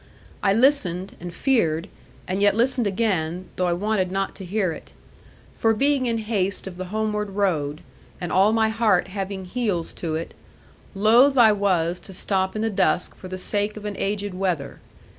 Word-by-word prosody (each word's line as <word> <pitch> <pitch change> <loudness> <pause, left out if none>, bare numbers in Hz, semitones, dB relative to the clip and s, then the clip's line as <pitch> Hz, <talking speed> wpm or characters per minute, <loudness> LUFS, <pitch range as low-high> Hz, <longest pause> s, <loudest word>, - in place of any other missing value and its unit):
I 195 - +3
listened, 200 -6 +2
and 175 0 -7
feared, 175 - +1 0.4
and 190 +2 -1
yet 205 0 +4
listened 240 0 +1
again, 185 -4 -1
though 180 - 0
I 175 - +2
wanted 190 0 0
not 195 0 -1
to 195 - -8
hear 190 -1 0
it. - - -10 0.6
For 225 -1 +2
being 275 +1 +2
in 230 -1 0
haste 205 -4 -1
of 185 -2 -7
the 185 - -4
homeward 210 +1 -2
road, 165 -7 -1 0.4
and 175 -2 -4
all 195 +3 +4
my 220 0 +2
heart 215 -5 +2
having 195 -1 -4
heels 195 -5 -2
to 160 -2 -2
it, 165 +1 -5 0.6
loath 235 +7 +5
I 230 -3 +7
was 180 -4 +1
to 190 - -9
stop 190 +1 -1
in 215 - -1
the 225 - 0
dusk 185 -2 +1
for 185 - -11
the 185 0 -5
sake 205 +3 -1
of 210 - -8
an 205 -1 -3
aged 200 0 -2
wether. 180 -7 -2
195 Hz, 180 wpm, -23 LUFS, 180-220 Hz, 0.6 s, I